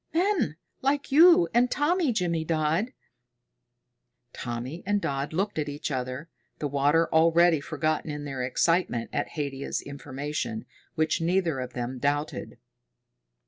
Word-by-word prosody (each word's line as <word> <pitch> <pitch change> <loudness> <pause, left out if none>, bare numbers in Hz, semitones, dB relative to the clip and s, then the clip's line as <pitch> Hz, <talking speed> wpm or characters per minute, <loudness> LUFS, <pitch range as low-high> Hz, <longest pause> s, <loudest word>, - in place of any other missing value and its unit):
"Men 350 - +2 0.3
like 280 +1 0
you 345 +4 +7
and 245 +1 +4
Tommy, 305 +1 +1
Jimmydodd." 165 +1 0 1.4
Tommy 125 +7 -5
and 205 +1 +1
Dodd 140 -5 -2
looked 190 +2 -1
at 150 -1 -2
each 145 +1 -4
other, 130 +3 -3 0.3
the 150 - -2
water 145 +4 +2
already 165 0 +5
forgotten 155 +1 -2
in 150 0 -5
their 135 -2 -4
excitement 130 -1 +1
at - - -2
Haidia's 140 -2 -2
information, 145 - -5 0.3
which 155 0 +1
neither 170 -4 +1
of 125 -1 -5
them 125 +1 -4
doubted. 145 +3 -2
155 Hz, 125 wpm, -27 LUFS, 140-190 Hz, 1.4 s, you